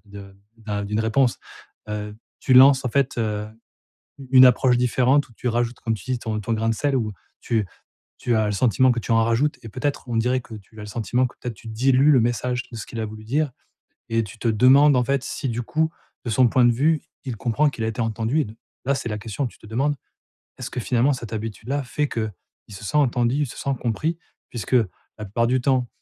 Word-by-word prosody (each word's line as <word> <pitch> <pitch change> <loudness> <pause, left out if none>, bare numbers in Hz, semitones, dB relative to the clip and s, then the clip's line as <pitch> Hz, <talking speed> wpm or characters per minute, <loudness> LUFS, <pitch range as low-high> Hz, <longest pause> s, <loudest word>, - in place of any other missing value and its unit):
de 100 -1 -11 0.2
d'un 105 -2 -4
d'une 105 +2 -1
réponse, 120 +3 +2 0.5
heu, 105 0 -5 0.2
tu 130 - +2
lances 135 +1 +7
en - - 0
fait, 135 0 0
heu, 105 -1 -2 0.7
u 135 - -10
une 130 -1 +9
approche 125 0 +4
différente, 125 +3 +2
ou - - -19
tu 125 - -5
rajoutes 120 0 -1
comme 115 -1 -1
tu - - -11
dis 125 - -1
ton 110 -2 -3
ton 115 +3 -2
grain 115 +1 0
de 115 - +1
sel 140 +4 0
ou 110 -3 -2 0.3
tu 110 -4 0 0.5
tu 120 -2 0
as 110 -1 +2
le 105 - -1
sentiment 125 +4 +3
que 120 - -2
tu 115 - -8
en 115 0 +4
rajoutes 120 +6 +1
et 115 - -7
peut-être, 140 +5 -3
on 120 - -3
dirait 125 +3 +2
que 115 -2 -12
tu 105 +1 -14
as - - -7
le - - -8
sentiment 115 +4 0
que, 125 - -12
peut-être, 120 -2 -5
tu 115 - -16
dilues 130 +6 +3
le 130 - +5
message 120 +1 -1
de 115 - -8
ce 110 - -6
qu'il 115 - -6
a 110 - -1
voulu 110 0 -10
dire, 145 +5 0 0.6
et 115 0 +1
tu 105 +2 -11
te 115 - -1
demandes 130 +6 +6
en 125 - +3
fait, 140 +2 0
si 135 - -3
du 120 +1 -2
coup, 160 +6 0 0.3
de 120 - -2
son 125 +2 +4
point 125 +2 +3
de 120 - +5
vue, 150 +5 +2 0.2
il 125 -4 -4
comprend 130 +7 +1
qu'il 120 -5 -6
a 110 - 0
été 115 +1 -4
entendu, 115 +5 0
et - - -2
donc, 110 +1 -12 0.3
là 140 - +2
c'est 120 - -4
la 105 - -3
question, 110 +5 -3
tu - - -16
te 110 - -14
demandes: 135 +7 0 0.6
«Est-ce 125 - -5
que 125 - -3
finalement 125 +4 +2
cette 120 -4 -7
habitude-là 115 +6 -3
fait 145 +3 -2
qu'il 110 -2 -7
se 95 - -10
sent 150 - 0
entendu, 125 -2 +2
il - - -2
se - - -10
sent 140 - -2
compris?» 150 +8 -1 0.3
puisque, 120 +1 -6 0.4
la 105 - -7
plupart 115 +4 0
du 130 0 +1
temps, 130 -2 +1
120 Hz, 240 wpm, -23 LUFS, 110-130 Hz, 0.7 s, une